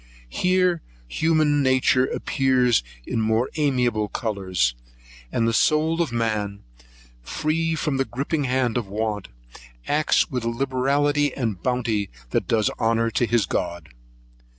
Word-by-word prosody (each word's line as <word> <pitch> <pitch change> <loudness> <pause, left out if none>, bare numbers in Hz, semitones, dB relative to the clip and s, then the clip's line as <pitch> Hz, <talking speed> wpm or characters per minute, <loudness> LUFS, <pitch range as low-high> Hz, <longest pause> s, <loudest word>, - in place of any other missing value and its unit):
Here 180 - +2 0.3
human 155 - +2
nature 130 -1 +3
appears 130 -4 +2 0.2
in 115 - -1
more 110 +3 +1
amiable 125 -8 +1
colours, 95 - -1 0.6
and 115 -1 +1
the 115 - +1
soul 155 +6 +2
of 160 -7 -1
man, 105 -3 -2 0.6
free 160 - -1
from 150 -3 -1
the 135 - +1
gripping 140 +4 -2
hand 125 -2 0
of 115 -5 -2
want, 105 0 -3 0.6
acts 155 +2 +2
with 125 -3 -2
a 115 - 0
liberality 140 +3 +1
and 110 -9 -2
bounty 115 -5 -1 0.2
that - - 0
does 110 -3 +2
honour 115 0 +1
to 120 - +1
his 115 -2 +2
God. 85 0 -3
125 Hz, 130 wpm, -23 LUFS, 110-145 Hz, 0.6 s, nature